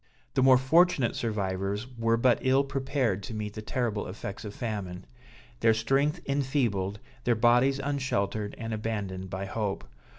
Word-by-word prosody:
The - - +2
more 130 0 +7
fortunate 140 -1 +3
survivors 100 -1 -2
were 115 0 +2
but 120 +1 +3
ill 130 +1 +3
prepared 135 -6 -1
to 110 +3 -7
meet 105 -1 -4
the 110 - -6
terrible 110 -2 -2
effects 100 +3 -6
of 105 -1 -7
famine; 100 -6 -4 0.5
their 115 -1 +4
strength 135 +7 +1
enfeebled, 125 -9 0 0.3
their 120 - +3
bodies 120 +4 +4
unsheltered 130 -7 -1
and 115 -1 -4
abandoned 105 -4 -3
by 95 +1 -4
hope. 100 - -3
115 Hz, 145 wpm, -28 LUFS, 100-130 Hz, 0.5 s, more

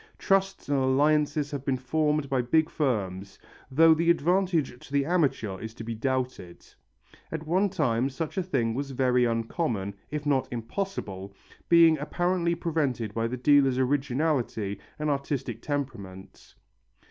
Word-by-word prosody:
Trusts 195 0 0
and 140 -1 +1
alliances 145 +2 +2
have 140 -2 -4
been 135 -2 0
formed 150 +3 0
by 135 -2 +1
big 155 +6 +2
firms, 100 - -2 0.3
though 160 +4 +6
the 165 +2 +1
advantage 170 -5 +1
to - - -19
the 140 -1 +1
amateur 140 - 0
is 110 0 -8
to - - -8
be 115 +1 -4
doubted. 125 -7 -3 0.7
At 160 0 -5
one 185 +5 +2
time 135 -9 0
such 155 +6 -5
a 190 - +1
thing 130 -11 -1
was 140 +3 -3
very 125 -2 +2
uncommon, 115 - -2 0.2
if 150 0 -4
not 140 -3 +1
impossible, 115 - -5 0.3
being 165 -2 +6
apparently 170 +3 0
prevented 145 -10 -2
by 115 +1 0
the 125 +2 -4
dealer's 135 -1 +4
originality 130 -6 0 0.2
and 150 0 -1
artistic 135 -4 -3
temperament. 115 -10 -6
140 Hz, 145 wpm, -27 LUFS, 120-160 Hz, 0.7 s, though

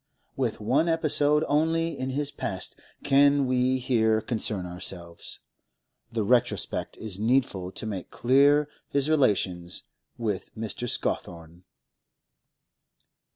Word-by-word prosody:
With 125 -5 -1
one 135 +10 +2
episode 150 -2 +3
only 165 +2 +1
in 130 0 -4
his 145 +2 -1
past 95 -2 -5 0.3
can 140 0 +4
we 130 0 +2
here 115 -4 +2
concern 110 -5 -1
ourselves; 90 -1 -7 0.7
the 115 -2 -1
retrospect 120 +2 0
is 100 -3 -6
needful 110 -6 +1
to - - -5
make 100 -5 -5
clear 140 +4 +4 0.2
his 140 +2 +1
relations 95 - +1 0.3
with 105 -5 -3
Mr. 115 +2 -4
Scawthorne. 85 -2 -3
120 Hz, 110 wpm, -27 LUFS, 100-140 Hz, 0.7 s, can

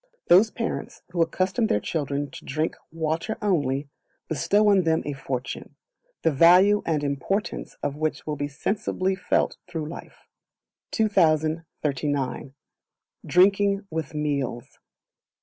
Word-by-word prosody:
Those 190 +6 +7
parents 230 +1 -5
who 175 -1 0
accustom 185 +7 +1
their 105 - +2
children 145 0 -2
to - - -10
drink 155 +3 -2 0.2
water 165 +5 -2
only, 145 -8 0 0.4
bestow 205 +6 +2
on 200 -2 +5
them 160 -2 +1
a 145 - -2
fortune, 135 -2 -5 0.5
the 165 - +4
value 180 +8 +6
and 155 -3 +1
importance 145 +9 -2
of 145 0 -2
which 155 0 -2
will 150 - -2
be 145 0 -2
sensibly 190 +5 -1
felt 180 -1 0
through 165 -4 -4
life. 165 - -10 0.6
2039. 155 -8 0 0.7
Drinking 200 +2 +4
with 160 -1 -4
Meals. 140 -5 -3
160 Hz, 120 wpm, -25 LUFS, 145-190 Hz, 0.7 s, Those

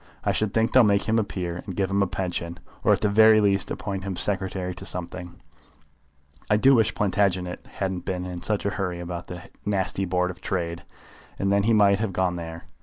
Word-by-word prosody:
I - - +2
should 110 -2 0
think 115 0 +1
they'll 130 - +7
make 100 -2 +3
him 110 +1 +2
a - - +2
peer, 90 -3 -4
and 95 -4 -7
give 95 0 -1
him 100 0 +2
a 100 - +2
pension, 85 -2 -3 0.3
or - - +4
at - - +3
the - - +2
very 110 +1 +6
least 100 -2 +2
appoint 95 -2 -4
him 95 -1 -4
secretary 95 -1 0
to 90 - -10
something. 90 -1 -6 1.1
I 105 - +4
do 135 +5 +5
wish 115 -3 +3
Plantagenet 95 -3 0
hadn't 95 -2 -4
been 90 -1 -3
in 90 -1 -6
such 105 -2 0
a 100 - +1
hurry 90 -2 -3
about 85 0 -6
that 90 +2 -9
nasty 95 -1 -1
Board 90 0 0
of 90 - -14
Trade, 85 -2 -3 0.6
and 100 0 0
then 100 0 +3
he 115 +3 +2
might 100 -2 +4
have 110 -3 -2
gone 90 -1 0
there. 80 -1 -7
95 Hz, 215 wpm, -25 LUFS, 90-100 Hz, 1.1 s, they'll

